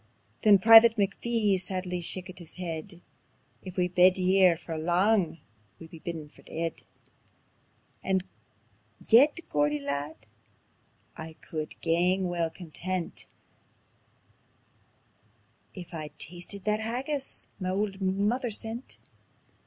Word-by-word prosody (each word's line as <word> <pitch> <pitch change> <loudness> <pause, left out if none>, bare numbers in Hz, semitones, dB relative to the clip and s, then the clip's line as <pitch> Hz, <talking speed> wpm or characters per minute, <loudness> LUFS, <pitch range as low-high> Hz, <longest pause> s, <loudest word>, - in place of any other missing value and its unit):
Then 210 -3 +7
Private 225 +3 +8
McPhee 205 -1 +1
sadly 185 -1 -3
shakit 185 +2 0
his 170 - -12
heid: 175 0 -6 0.6
"If 185 -1 -10
we 180 -1 +2
bide 180 +1 +5
here 185 -2 +4
for 165 -1 -7
lang, 175 +1 +1 0.4
we'll 160 - -12
be 165 - -12
bidin' 160 -2 -6
for - - -20
deid. 165 0 -4 1.2
And 190 -1 +1 0.8
yet, 280 +8 +5
Geordie 150 0 +1
lad, 140 -3 -4 0.9
I 160 0 -8
could 155 -1 -7
gang 180 +3 +2
weel 170 -2 0
content 175 +1 -5 2.5
If 180 -2 -10
I'd 155 -2 -7
tasted 180 +3 -5
that 210 0 +1
haggis 260 +5 -3
ma 185 -1 -2
auld 195 +1 -2
mither 205 +6 0
sent." 225 +3 -5
185 Hz, 110 wpm, -28 LUFS, 165-205 Hz, 2.5 s, Private